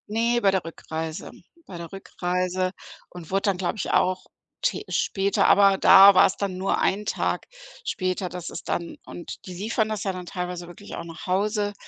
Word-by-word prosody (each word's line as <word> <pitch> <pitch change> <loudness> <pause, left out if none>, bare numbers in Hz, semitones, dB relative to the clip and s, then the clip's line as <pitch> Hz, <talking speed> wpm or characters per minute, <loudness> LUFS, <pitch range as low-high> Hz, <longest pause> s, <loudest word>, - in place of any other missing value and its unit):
Ne, 230 +2 +1
bei 195 - +4
der 190 -2 0
Rückreise. 160 -1 -6 0.4
Bei 180 - -8
der 170 -1 -8
Rückreise 185 -1 -2 0.4
und 175 -3 -11
wurde 195 +1 +1
dann, 200 -3 +1
glaube 180 +3 -2
ich, 195 - -3
auch 185 0 +1 0.4
t - - 0
später 195 0 +1
aber 195 -1 +6
da 195 +1 +9
war - - +7
es 190 - -5
dann 195 -2 -2
nur 190 +1 0
1 210 +2 0
Tag - - -2 0.4
später, 185 - -2
dass 180 -1 -6
es - - -7
dann 170 -1 -3
und 175 - -9
die 185 - -7
liefern 215 +3 -1
das 215 -2 -3
ja 195 - 0
dann 180 -1 -7
teilweise 180 -1 -5
wirklich 175 +4 -10
auch - - -6
nach 165 -1 -10
Hause. 205 +2 0
185 Hz, 190 wpm, -25 LUFS, 180-200 Hz, 0.4 s, da